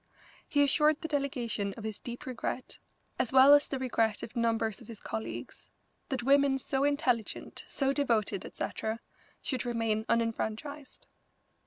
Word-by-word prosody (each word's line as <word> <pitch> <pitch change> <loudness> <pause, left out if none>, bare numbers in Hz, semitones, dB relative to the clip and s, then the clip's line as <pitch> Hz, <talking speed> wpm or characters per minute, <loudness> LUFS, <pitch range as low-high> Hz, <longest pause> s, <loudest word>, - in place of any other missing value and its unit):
He 285 -1 +4
assured 300 +2 +4
the 320 - -4
delegation 245 -9 -1
of 225 - -8
his 215 -1 -4
deep 245 +5 -7
regret, 255 0 -4 0.4
as 235 - +1
well 265 +2 +8
as 290 0 +6
the 275 - -2
regret 230 -4 0
of 235 - -8
numbers 230 -1 0
of 230 - -13
his 225 -3 -9
colleagues, 115 +2 -6 0.4
that 260 -3 -2
women 275 +1 +4
so 270 +1 -1
intelligent, 275 -6 0
so 270 -1 0
devoted, 225 -8 +1
etc., 220 +1 -4 0.4
should 260 -3 -2
remain 225 -3 0
unenfranchised. 230 +5 -2
245 Hz, 145 wpm, -31 LUFS, 220-280 Hz, 0.4 s, well